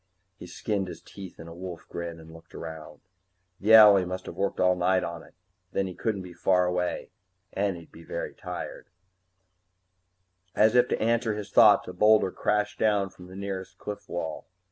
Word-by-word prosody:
He 90 - -11
skinned 100 +2 -2
his - - -8
teeth 95 -3 -11
in 80 - -9
a 85 - -9
wolf 90 -1 -8
grin 85 -1 -6
and 80 0 -13
looked 80 0 -15
around. 80 -1 -9 0.6
The 110 +3 +6
owlie 105 -3 +8
must 90 +1 -5
have - - -7
worked 95 +2 -2
all 90 0 +4
night 90 +1 +2
on 85 -1 -5
it. - - -18 0.4
Then 100 - 0
he 95 - -6
couldn't 100 0 -2
be 90 -1 -10
far 90 0 +2
away 90 0 -2 0.4
and 100 -2 -1
he'd 85 - -14
be 80 - -14
very - - -5
tired - - -7 1.7
As 110 +1 +4
if 125 0 +5
to - - -1
answer 115 -1 +1
his 105 -1 -7
thoughts, 105 -1 +6
a 90 - -6
boulder 105 0 +4
crashed 105 0 -1
down 100 -3 +2
from 90 - -14
the 95 - -12
nearer 95 -1 -4
cliff 105 0 -8
wall. 80 -2 -5
95 Hz, 190 wpm, -27 LUFS, 90-105 Hz, 1.7 s, owlie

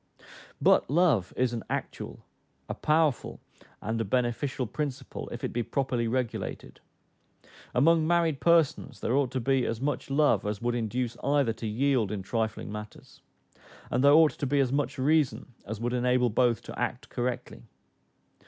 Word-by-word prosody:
But - - +4
love 145 - +3
is 125 -1 +1
an 115 - -3
actual, - - -5 0.4
a - - -3
powerful, 155 -3 +1 0.4
and 110 +2 -1
a - - +1
beneficial 125 +4 -1
principle, 140 +3 -5
if - - -7
it - - -3
be 120 - 0
properly 125 -1 -1
regulated. 125 0 -3 1.0
Among 160 +4 +4
married 165 -4 +2
persons 170 -4 +2
there 120 - -1
ought 135 -1 +2
to 130 - -2
be 130 +1 +1
as 115 -1 -2
much 140 0 -2
love 140 -7 +3
as 105 -1 -3
would 120 0 -1
induce 120 +1 -2
either 140 -4 +2
to 115 0 -6
yield 120 -1 +1
in 100 -3 -4
trifling 110 +1 -2
matters; 105 0 -10 0.7
and 125 +2 +1
there 140 0 +7
ought 155 -1 +6
to 140 - -1
be 140 +2 +1
as 130 -2 +2
much 145 +2 -1
reason 135 -4 +1
as 105 +1 -5
would 120 +2 -2
enable 125 -1 +2
both 120 -1 +2
to - - -8
act - - -3
correctly. 125 0 -4
125 Hz, 160 wpm, -28 LUFS, 115-140 Hz, 1.0 s, there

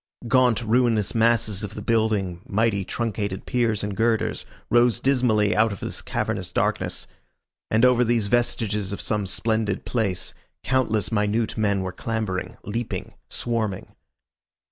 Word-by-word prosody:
Gaunt 125 -2 +3
ruinous 115 -3 +2
masses 115 -3 +2
of 105 -1 -6
the 105 - -5
building, 105 -6 +1
mighty 105 -1 +1
truncated 100 -3 -3
piers 115 -4 0
and 105 -1 -3
girders, 115 +1 0 0.2
rose 120 -2 +4
dismally 120 -6 +2
out 110 0 +3
of 100 - -6
this - - -5
cavernous - - -3
darkness. - - -1 0.6
And 110 +3 +4
over 125 -1 +5
these 115 -2 +2
vestiges 105 -3 0
of - - -5
some 105 -3 -1
splendid 110 0 -1
place, 100 -7 -1 0.3
countless 120 -6 +1
minute 110 +1 0
men 100 -3 +1
were 95 - -3
clambering, 110 -3 -3
leaping, 115 +3 -4 0.2
swarming. 110 -5 -2
110 Hz, 135 wpm, -24 LUFS, 100-115 Hz, 0.6 s, over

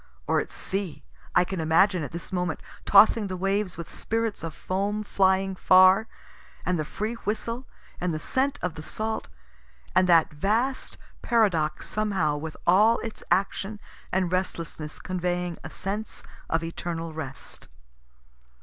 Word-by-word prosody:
Or - - +2
at - - -3
sea, 190 -7 -4 0.3
I - - +6
can 180 0 -4
imagine 170 +4 +3
it 145 - -4
this 170 +3 -7
moment, 180 -3 -1 0.3
tossing 210 +1 +6
the 185 -1 -4
waves, 195 0 0
with 170 -2 -6
spirits 225 -1 -2
of 165 -3 -5
foam 200 +3 -2
flying 190 -1 +2
far, 185 +4 +6 0.6
and 180 -2 +1
the 155 - -1
free 215 +8 -3
whistle, 230 +4 -3 0.3
and 180 0 0
the 155 - -2
scent 270 - 0
of 180 -2 -1
the 155 - -8
salt 220 +7 -3 0.7
and 185 0 +4
that 165 -3 +5
vast 220 - 0 0.2
paradox 195 -10 +1
somehow 195 -8 +1
with 155 +1 -6
all 210 +6 +5
its 225 -1 -6
action 200 +2 0 0.3
and 185 -2 +1
restlessness 165 -4 -3
conveying 180 -1 -2
a 155 - -6
sense 205 +6 -4 0.3
of 160 0 +1
eternal 165 0 -4
rest. 140 -4 -7
185 Hz, 145 wpm, -26 LUFS, 165-210 Hz, 0.7 s, I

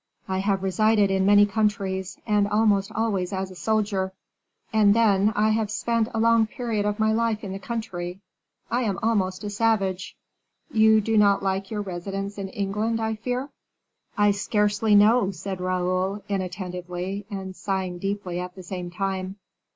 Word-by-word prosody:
I 190 0 -1
have 195 -1 0
resided 205 +1 +3
in 190 0 +2
many 205 0 +7
countries, 200 -3 -1
and 210 -2 +2
almost 205 -1 +2
always 210 -5 -1
as 190 -1 -3
a - - -11
soldier; 200 -2 0 0.6
and 210 -2 +5
then, 210 -2 +4
I 215 +1 +3
have 215 -1 0
spent 230 +1 0
a - - 0
long 230 -1 +4
period 220 -3 -2
of 210 0 -1
my 220 0 +2
life 225 -1 0
in 195 - -5
the 195 - -5
country. 190 -5 -5 0.5
I 245 - +1
am 205 -6 -1
almost 195 -4 0
a 205 - -4
savage." 200 -4 0 0.6
"You 220 -1 +5
do 220 +1 +2
not 200 -1 +4
like 195 0 -1
your 210 -2 -3
residence 195 +2 -5
in 195 -1 -4
England, 210 +4 -1
I 220 0 -1
fear." 250 +5 -3 0.7
"I 205 0 +4
scarcely 210 +1 +1
know," 210 +1 +5
said 190 -1 -5
Raoul, 185 +2 -1
inattentively, 185 0 -4
and 190 -2 -6
sighing 190 -3 -3
deeply 195 -2 -3
at 180 0 -6
the 185 - -10
same 180 -1 -5
time. 190 +1 -3
200 Hz, 165 wpm, -25 LUFS, 190-220 Hz, 0.7 s, many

